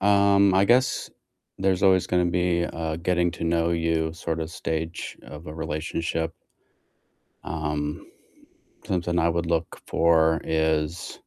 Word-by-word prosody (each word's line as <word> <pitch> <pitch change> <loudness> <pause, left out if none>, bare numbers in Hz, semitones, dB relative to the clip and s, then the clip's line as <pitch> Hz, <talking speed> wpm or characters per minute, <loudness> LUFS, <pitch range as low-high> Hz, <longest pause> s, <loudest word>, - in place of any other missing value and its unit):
um, 100 0 +4
I 95 +1 +5
guess 125 +4 +2 0.5
there's 95 0 +1
always 95 -2 +4
gonna 90 -1 +2
be 85 0 +1
a 80 -2 -3
getting 85 0 +1
to - - -5
know 85 0 +1
you 80 -1 0
sort 80 -1 -4
of 80 0 -4
stage 80 -1 -4
of 75 +6 -11
a 75 - -7
relationship. 80 +1 -3 1.1
Um, 75 -1 -3 0.8
something 85 -2 -1
I 85 0 +3
would 85 0 -1
look 85 -1 -2
for 80 -1 +3
is 80 +1 0
85 Hz, 135 wpm, -25 LUFS, 80-90 Hz, 1.1 s, I